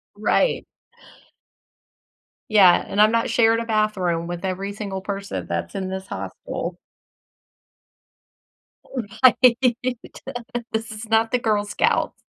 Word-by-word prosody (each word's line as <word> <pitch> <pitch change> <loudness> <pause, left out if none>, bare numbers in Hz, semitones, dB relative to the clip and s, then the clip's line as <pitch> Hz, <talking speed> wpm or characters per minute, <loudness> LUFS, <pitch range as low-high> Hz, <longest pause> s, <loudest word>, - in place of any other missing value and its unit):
Right. - - +1 1.8
Yeah, 195 -5 +6
"And 205 - +1
I'm 215 - +6
not 230 0 +1
sharing 230 -1 +3
a 230 - -3
bathroom 200 -6 0
with 175 +2 -5
every 190 +2 -3
single 200 -2 -5
person 200 0 -5
that's - - -4
in 190 -1 -3
this 190 0 -5
hostel." - - -5 2.5
Right. 250 -1 +6 1.1
This 220 0 -3
is 215 +1 -8
not 225 +1 +3
the 250 - +2
Girl 210 -3 +1
Scouts. 205 - 0
210 Hz, 110 wpm, -22 LUFS, 190-225 Hz, 2.5 s, Yeah